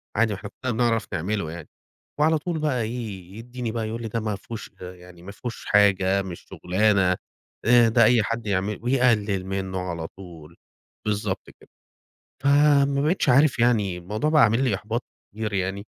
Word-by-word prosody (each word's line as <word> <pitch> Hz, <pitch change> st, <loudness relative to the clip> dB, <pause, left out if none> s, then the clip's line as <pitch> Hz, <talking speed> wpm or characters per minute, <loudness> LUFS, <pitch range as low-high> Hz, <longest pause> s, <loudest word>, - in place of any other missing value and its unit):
عادي 110 Hz, 0 st, +2 dB
ما -, -, -5 dB
إحنا 100 Hz, -, -8 dB
كُلّنا 130 Hz, -2 st, 0 dB
بنعرف 115 Hz, -1 st, +1 dB
نعمله 90 Hz, 0 st, -2 dB
يعني." 85 Hz, -2 st, -9 dB, 0.5 s
وعلى 160 Hz, +1 st, +4 dB
طول 160 Hz, +1 st, -3 dB
بقى 145 Hz, -6 st, 0 dB
إيه، 110 Hz, -6 st, -5 dB
يدّيني 120 Hz, 0 st, -5 dB
بقى 115 Hz, -1 st, -3 dB
يقول 115 Hz, +2 st, -5 dB
لي: 115 Hz, -, -4 dB
"ده 115 Hz, +1 st, -2 dB
ما 105 Hz, -2 st, -2 dB
فيهوش 115 Hz, +2 st, -9 dB
يعني 90 Hz, -1 st, -11 dB
ما 100 Hz, -, -8 dB
فيهوش 120 Hz, +3 st, -7 dB
حاجة، 100 Hz, -1 st, +3 dB
مش 90 Hz, -3 st, -8 dB
شُغلانة، 95 Hz, -1 st, +2 dB, 0.5 s
آآ 120 Hz, 0 st, +6 dB
ده 115 Hz, +1 st, +4 dB
أي 115 Hz, 0 st, +4 dB
حد 115 Hz, +1 st, -3 dB
يعمله." 100 Hz, +1 st, -1 dB
ويقلِّل 115 Hz, -7 st, +2 dB
منّه 95 Hz, -1 st, -3 dB
على 85 Hz, -3 st, -4 dB
طول، 85 Hz, -4 st, -13 dB, 0.5 s
بالضبط 105 Hz, -2 st, -2 dB
كده. -, -, -20 dB, 0.7 s
فما 140 Hz, -1 st, +4 dB
بقيتش 160 Hz, +1 st, +1 dB
عارف 135 Hz, +1 st, +4 dB
يعني 105 Hz, -7 st, +2 dB
الموضوع 105 Hz, -, -2 dB
بَقى 150 Hz, -3 st, +5 dB
عامل 115 Hz, +4 st, +3 dB
لي 125 Hz, -6 st, +1 dB
إحباط 110 Hz, +5 st, -3 dB, 0.3 s
كتير 105 Hz, 0 st, -4 dB
يعني، 95 Hz, +1 st, -2 dB
110 Hz, 175 wpm, -24 LUFS, 95-120 Hz, 0.7 s, آآ